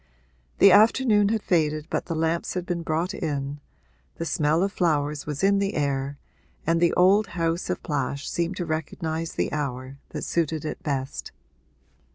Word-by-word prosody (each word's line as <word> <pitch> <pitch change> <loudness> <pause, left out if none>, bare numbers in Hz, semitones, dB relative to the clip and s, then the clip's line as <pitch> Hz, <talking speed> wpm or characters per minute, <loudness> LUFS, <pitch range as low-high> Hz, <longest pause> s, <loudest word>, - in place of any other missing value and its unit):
The 200 - +7
afternoon 215 0 +5
had 220 -1 0
faded 155 -3 +1
but - - -1
the 165 - -3
lamps 165 +3 -1
had 180 -1 -2
been 175 -1 -2
brought 165 +4 -1
in, 140 -1 -3 0.6
the 165 - -4
smell 155 +2 +2
of 200 - 0
flowers 150 -4 0
was 150 +1 -3
in 200 0 +4
the 200 +1 -1
air 140 -1 -1 0.5
and 165 +1 +2
the 170 - +4
old 195 +4 +4
house 165 +1 -1
of - - -2
Plash 140 -2 -2
seemed 170 +2 -1
to 175 - -2
recognise 160 +1 -3
the - - -1
hour 135 -2 -4
that - - -5
suited 160 -2 -1
it - - -5
best. 135 -2 -3
160 Hz, 170 wpm, -25 LUFS, 145-180 Hz, 0.6 s, The